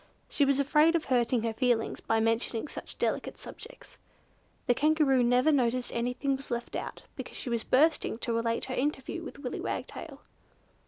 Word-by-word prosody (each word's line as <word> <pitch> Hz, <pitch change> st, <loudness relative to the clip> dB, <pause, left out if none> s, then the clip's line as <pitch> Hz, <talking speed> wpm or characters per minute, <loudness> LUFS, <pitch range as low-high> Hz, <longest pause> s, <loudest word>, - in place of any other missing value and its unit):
She 285 Hz, -, +2 dB
was 275 Hz, 0 st, +2 dB
afraid 300 Hz, +4 st, +4 dB
of 330 Hz, -, 0 dB
hurting 245 Hz, -2 st, +2 dB
her 230 Hz, -1 st, -1 dB
feelings 240 Hz, -1 st, +1 dB
by 225 Hz, -, +1 dB
mentioning 225 Hz, +3 st, 0 dB
such -, -, -9 dB
delicate -, -, -1 dB
subjects. -, -, -12 dB, 0.7 s
The 245 Hz, -, +4 dB
Kangaroo 295 Hz, -1 st, +3 dB
never 250 Hz, +5 st, +4 dB
noticed 250 Hz, -3 st, +1 dB
that -, -, -7 dB
anything 250 Hz, +3 st, 0 dB
was 270 Hz, +1 st, -9 dB
left 240 Hz, -1 st, -3 dB
out, -, -, -5 dB
because -, -, -7 dB
she 245 Hz, -, -5 dB
was 230 Hz, -1 st, 0 dB
bursting 300 Hz, -3 st, +2 dB
to 235 Hz, 0 st, -2 dB
relate 230 Hz, 0 st, 0 dB
her 260 Hz, -, -4 dB
interview 285 Hz, +4 st, -2 dB
with 330 Hz, -, -8 dB
Willy 275 Hz, -3 st, -5 dB
Wagtail. -, -, -5 dB
255 Hz, 175 wpm, -29 LUFS, 235-280 Hz, 0.7 s, afraid